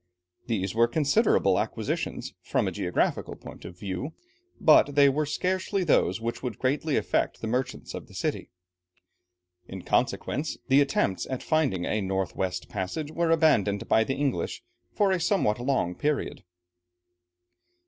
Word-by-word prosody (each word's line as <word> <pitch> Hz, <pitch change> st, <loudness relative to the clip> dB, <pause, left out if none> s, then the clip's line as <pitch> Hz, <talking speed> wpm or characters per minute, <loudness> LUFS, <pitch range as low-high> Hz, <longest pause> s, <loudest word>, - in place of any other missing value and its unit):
These 100 Hz, -5 st, -1 dB
were 115 Hz, +1 st, +4 dB
considerable 140 Hz, +3 st, +3 dB
acquisitions, -, -, -3 dB
from -, -, 0 dB
a -, -, -1 dB
geographical -, -, -1 dB
point -, -, -12 dB
of 85 Hz, -, -9 dB
view, 100 Hz, -, -5 dB, 0.4 s
but 145 Hz, -2 st, +5 dB
they 140 Hz, -1 st, +7 dB
were 150 Hz, +2 st, 0 dB
scarcely 185 Hz, +4 st, -1 dB
those 160 Hz, -, +2 dB
which 115 Hz, +1 st, -4 dB
would 125 Hz, -5 st, -4 dB
greatly 140 Hz, +3 st, 0 dB
affect -, -, 0 dB
the -, -, -5 dB
merchants 125 Hz, +3 st, -3 dB
of -, -, -7 dB
the -, -, -15 dB
city. -, -, -3 dB, 1.2 s
In 95 Hz, -2 st, -8 dB
consequence, 150 Hz, +4 st, -1 dB
the 135 Hz, +2 st, +6 dB
attempts 120 Hz, -8 st, 0 dB
at 130 Hz, -1 st, -4 dB
finding 140 Hz, -, +1 dB
a 110 Hz, -, 0 dB
north 95 Hz, -1 st, -2 dB
west 90 Hz, -4 st, -2 dB
passage 105 Hz, +11 st, -4 dB
were 170 Hz, +1 st, 0 dB
abandoned 150 Hz, -, +3 dB
by 110 Hz, -, +4 dB
the 135 Hz, +4 st, -2 dB
English 135 Hz, -12 st, -2 dB, 0.3 s
for 200 Hz, -2 st, +2 dB
a 185 Hz, -, +1 dB
somewhat 165 Hz, -, +1 dB
long 120 Hz, -8 st, 0 dB
period. 145 Hz, +9 st, -2 dB
130 Hz, 150 wpm, -27 LUFS, 100-155 Hz, 1.2 s, they